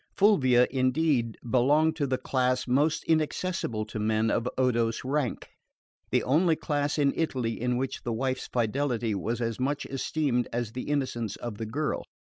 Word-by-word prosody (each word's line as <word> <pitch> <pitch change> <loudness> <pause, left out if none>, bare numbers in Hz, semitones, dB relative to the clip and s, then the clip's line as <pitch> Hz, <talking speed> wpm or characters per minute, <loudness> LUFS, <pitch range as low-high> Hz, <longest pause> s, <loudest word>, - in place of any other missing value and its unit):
Fulvia, 130 - +5
indeed, 130 -2 +1
belonged 145 +6 +3
to 145 -3 0
the 130 -1 0
class 125 -1 0
most 145 +5 +2
inaccessible 155 -7 -1
to 110 0 -6
men 110 +1 +1
of 120 +2 0
Odo's 120 -3 +1
rank: 135 -2 -2 0.6
the - - +2
only 160 +5 +3
class 145 -1 -1
in 140 -2 +3
Italy 125 -9 -1
in 125 0 +1
which 130 +1 -3
the 120 - -3
wife's 130 +3 -2
fidelity 120 -1 0
was 110 +5 -2
as 115 0 -2
much 140 +3 -1
esteemed 135 -2 -1
as 120 -2 -2
the 125 +4 -6
innocence 130 -7 -1
of 115 -3 -7
the 110 - -3
girl. 145 +7 -2
130 Hz, 160 wpm, -28 LUFS, 115-145 Hz, 0.6 s, Fulvia